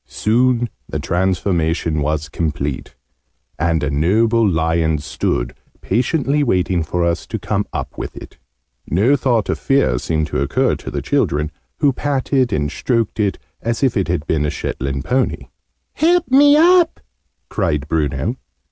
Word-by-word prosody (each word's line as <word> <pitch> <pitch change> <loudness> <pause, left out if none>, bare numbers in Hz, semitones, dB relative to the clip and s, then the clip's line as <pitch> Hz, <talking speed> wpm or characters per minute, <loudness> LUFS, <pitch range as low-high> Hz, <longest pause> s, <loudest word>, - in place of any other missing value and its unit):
Soon 120 +2 +1 0.2
the - - -2
transformation 85 -3 0
was 75 +1 -1
complete: 75 -3 -3 0.6
and 85 -2 +1
a 75 - 0
noble 110 +9 +2
lion 80 -1 +1
stood 70 -4 -2 0.3
patiently 140 - 0
waiting 90 -7 +1
for 85 +2 -1
us 85 0 -1
to - - -3
come - - -2
up - - -5
with - - -6
it. - - -11 0.5
No 105 - +3
thought 125 -5 +1
of - - -2
fear 135 - +2
seemed 80 +2 -1
to 65 - -1
occur 70 - +1
to - - -8
the - - -4
children, 75 +2 0 0.3
who 145 -3 +4
patted 135 -2 0
and 75 -5 -1
stroked 115 - -1
it 100 -2 +1 0.2
as 115 +3 -2
if 130 -3 +2
it 95 -4 0
had 85 -3 -1
been 80 -3 0
a 75 - 0
Shetland 70 -2 -4
pony. 130 +7 +1
{Image...The - - -15
mouse - - -25
lion} 330 +3 +5
"Help 355 -1 0
me 285 +2 +7
up!" 345 +1 +4 0.5
cried 75 -1 -1
Bruno. 75 -3 -1
90 Hz, 160 wpm, -19 LUFS, 80-125 Hz, 0.6 s, me